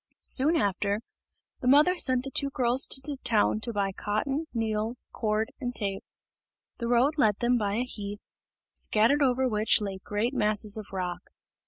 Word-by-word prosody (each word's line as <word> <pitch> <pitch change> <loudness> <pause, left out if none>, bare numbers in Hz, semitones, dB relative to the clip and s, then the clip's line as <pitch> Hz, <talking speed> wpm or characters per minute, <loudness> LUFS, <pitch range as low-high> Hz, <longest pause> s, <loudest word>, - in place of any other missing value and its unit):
Soon 295 +6 +3
after, 205 - 0 0.6
the 250 - -4
mother 295 +7 +5
sent 255 -7 +3
the 270 - -6
two 280 - +1
girls 255 -1 +2
to - - +4
the 290 -2 -5
town 215 -1 +2
to 235 +2 -1
buy 200 -2 -1
cotton, 215 +11 -2
needles, 225 +1 -2
cord, 215 0 -1
and 245 -1 -4
tape. 195 -2 -4 0.8
The 235 - -3
road 255 +6 +2
led 210 -5 +3
them 240 +1 +1
by 205 -1 -1
a 240 - 0
heath, 205 -4 -8 0.4
scattered 230 +7 +2
over 260 -1 +2
which 215 -2 +3
lay 195 -2 -5
great 215 +5 -2
masses 210 -3 +1
of 215 -2 -5
rock. 180 -2 -4
225 Hz, 170 wpm, -27 LUFS, 210-255 Hz, 0.8 s, mother